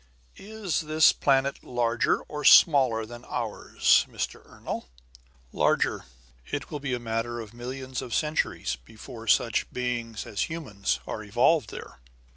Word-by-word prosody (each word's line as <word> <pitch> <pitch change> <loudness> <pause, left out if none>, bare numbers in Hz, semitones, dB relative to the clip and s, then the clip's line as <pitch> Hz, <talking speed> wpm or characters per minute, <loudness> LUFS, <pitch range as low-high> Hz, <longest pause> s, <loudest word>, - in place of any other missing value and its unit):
"Is 210 -4 -3
this 155 0 +4
planet 135 0 +1
larger 120 -1 +1
or 150 0 -7
smaller 130 -8 +6
than 120 +2 -11
ours, - - +2
Mr. - - -5
Ernol?" - - -6 0.7
"Larger. - - +1 0.5
It 145 -1 -4
will 150 - -4
be 140 -3 -2
a - - -5
matter 120 +1 -3
of 110 -1 -9
millions 130 +2 -5
of 120 - -4
centuries 150 - -1
before 115 - -11
such 115 +1 +2
beings 120 -3 -3
as 105 - -2
humans 125 -12 -2
are 110 - -5
evolved 120 +5 +2
there." - - -10
125 Hz, 135 wpm, -27 LUFS, 115-145 Hz, 0.7 s, smaller